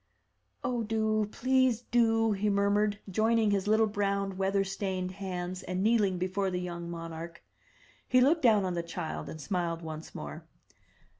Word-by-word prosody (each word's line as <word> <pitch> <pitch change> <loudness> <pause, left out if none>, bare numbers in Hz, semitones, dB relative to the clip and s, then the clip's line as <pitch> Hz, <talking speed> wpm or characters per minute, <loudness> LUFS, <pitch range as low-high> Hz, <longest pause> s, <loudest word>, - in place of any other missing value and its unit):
0h, 240 -3 -1
do! 215 -1 +1
please 255 -2 +2
do!'* 225 -2 +3
he 210 +1 0
murmured, 200 +1 +2
joining 220 +2 +2
his 200 -1 0
little 220 +1 +4
brown 200 -2 -1
weather 195 +1 +1
stained 190 -1 -3
hands, 185 -1 -5
and 185 0 -2
kneeling 210 -4 +3
before 190 +2 -1
the 180 -1 -2
young 170 -1 -5
monarch. 165 0 -7 0.6
He 255 - +4
looked 300 +6 +4
down 215 -6 +4
on 180 - -1
the 170 - -1
child 170 -1 -5
and 155 - -7
smiled 170 +1 -2
once 155 0 -7
more. 75 0 -7
200 Hz, 155 wpm, -30 LUFS, 180-220 Hz, 0.6 s, little